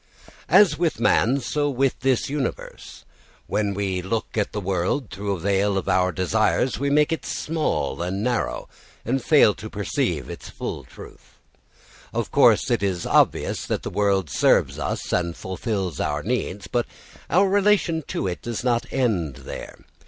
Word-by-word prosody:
As 175 -8 +5
with 170 -7 0
man, 120 +3 +3
so 145 +3 -1
with 135 -1 0
this 130 -2 +1
universe. 140 -3 -5 0.4
When 100 -2 -1
we 95 -2 -1
look 110 +5 -3
at 105 -2 0
the 105 - -3
world 95 +6 -1
through 100 0 -2
the 85 - -9
veil 100 0 +1
of 95 - -3
our 95 0 +2
desires 110 +7 +1
we 140 +1 0
make 150 +3 +3
it 165 - -2
small 150 - -2
and 95 +4 -2
narrow, 120 0 -1 0.4
and 130 +3 -1
fail 145 -9 +5
to 110 +2 -9
perceive 100 -2 -2
its - - -8
full - - -6
truth. - - -14 0.8
Of - - -2
course - - +4
it - - +2
is 95 -4 -1
obvious - - +2
that - - -2
the - - -4
world 100 -3 +1
serves - - +3
us - - -3
and 85 -2 0
fulfils 95 -1 -3
our 75 0 -1
needs, 105 -3 -2
but 120 -1 -1 0.4
our 195 +3 +4
relation 195 -4 +2
to - - -3
it 90 -2 -3
does 120 0 -4
not 120 -1 +1
end 95 - 0
there. - - -8
110 Hz, 165 wpm, -23 LUFS, 95-135 Hz, 0.8 s, As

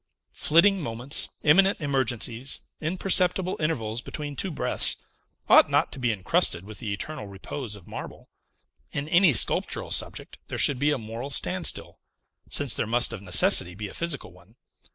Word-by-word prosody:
Flitting 185 +5 +3
moments, 120 +1 -2
imminent 190 +6 +3
emergencies, 130 -3 -1 0.2
imperceptible 185 +2 +1
intervals 120 -8 -3
between 145 +1 -7
two 190 - -4
breaths, 155 - +1 0.5
ought - - +6
not - - 0
to - - -9
be 125 -2 0
incrusted 90 -3 0
with 105 0 -11
the 110 -5 -5
eternal 105 +3 -6
repose 105 +4 -7
of 100 -4 -15
marble; - - -10 0.6
in 140 +1 -5
any 175 +1 +4
sculptural 120 - +2
subject, - - -2
there - - -6
should 135 -3 +6
be 145 +2 +1
a 145 - 0
moral 115 +3 -8
standstill, 180 +5 -2 0.5
since 145 -4 +3
there - - -2
must 120 +1 0
of 110 - -8
necessity 90 -1 +5
be 105 +1 -6
a - - -12
physical 170 -4 -4
one. 90 +5 -22
135 Hz, 155 wpm, -25 LUFS, 110-155 Hz, 0.6 s, ought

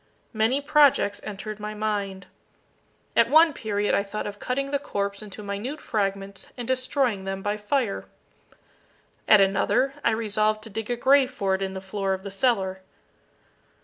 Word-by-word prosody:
Many 225 +5 +2
projects 285 -8 +3
entered 215 +1 -6
my 210 0 -5
mind. 200 -3 -2 0.9
At - - +5
one 320 +1 +6
period 205 -4 -1
I - - +3
thought 200 +1 -5
of 205 0 -6
cutting 275 +2 -2
the 280 - +1
corpse 200 -7 -3
into 210 0 -9
minute 205 +9 -4
fragments 195 -4 -3
and 240 -2 -5
destroying 255 -5 0
them 195 0 -4
by 205 0 0
fire. 215 0 -1 1.2
At 210 -2 +7
another 195 +7 +2
I - - +4
resolved 215 -1 0
to 225 - -10
dig 225 +2 -5
a 245 - +1
grave 265 +2 +4
for 195 -7 -1
it 190 - -1
in 190 0 -3
the 190 - -5
floor 195 0 -2
of 190 - -11
the 200 - -6
cellar. 195 -3 0
210 Hz, 165 wpm, -25 LUFS, 195-250 Hz, 1.2 s, At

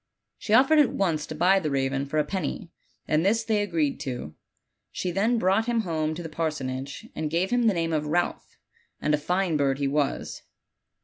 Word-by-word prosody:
She 215 - +2
offered 275 +6 +6
at 270 -5 +4
once 165 - 0
to 155 - -6
buy 190 +5 +4
the 155 -5 -2
raven 135 0 -1
for 155 - -3
a 150 - +4
penny, 180 +1 -4 0.4
and 155 +1 +2
this 225 +4 +2
they 220 -2 +1
agreed 165 -8 0
to. 125 - -5 0.6
She 180 - -3
then 215 +7 +1
brought 210 +2 +2
him 235 -1 +1
home 160 -5 -2
to 175 - -6
the - - -5
parsonage, 140 -4 -4
and 155 -1 -2
gave 170 +4 0
him 245 -1 +3
the 210 - +3
name 165 -1 -1
of 150 -1 -1
Ralph, 175 +3 -2 0.4
and 150 - 0
a - - +4
fine 180 +1 0
bird 135 -2 +1
he 140 -1 0
was. 140 0 -1
165 Hz, 200 wpm, -26 LUFS, 150-195 Hz, 0.6 s, offered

